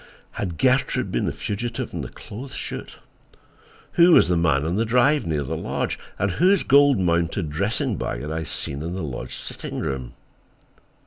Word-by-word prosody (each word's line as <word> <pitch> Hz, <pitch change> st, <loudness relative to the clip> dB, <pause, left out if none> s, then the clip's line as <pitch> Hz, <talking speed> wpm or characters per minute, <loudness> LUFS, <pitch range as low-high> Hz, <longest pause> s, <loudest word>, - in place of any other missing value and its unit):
Had 90 Hz, -5 st, -4 dB
Gertrude 130 Hz, -, +2 dB
been -, -, 0 dB
the -, -, 0 dB
fugitive 115 Hz, +3 st, -4 dB
in -, -, -3 dB
the -, -, -6 dB
clothes 130 Hz, +6 st, -9 dB
chute? -, -, -6 dB, 0.9 s
Who 175 Hz, 0 st, +6 dB
was 85 Hz, -, +6 dB
the 90 Hz, -, +3 dB
man 80 Hz, -4 st, +2 dB
on 85 Hz, +3 st, 0 dB
the 110 Hz, -, +2 dB
drive 125 Hz, -, +3 dB
near 75 Hz, -3 st, 0 dB
the 65 Hz, -, -3 dB
lodge, -, -, -2 dB, 0.2 s
and 100 Hz, 0 st, 0 dB
whose 180 Hz, -, +3 dB
gold 140 Hz, -1 st, +5 dB
mounted 85 Hz, -3 st, 0 dB
dressing 105 Hz, -, -1 dB
bag -, -, -3 dB
had 75 Hz, -, -5 dB
I 80 Hz, +1 st, -2 dB
seen 70 Hz, -2 st, -4 dB
in 85 Hz, +3 st, -4 dB
the 95 Hz, -, -3 dB
lodge 65 Hz, -6 st, -5 dB
sitting -, -, -6 dB
room? 65 Hz, -3 st, -4 dB
95 Hz, 180 wpm, -23 LUFS, 80-125 Hz, 0.9 s, Who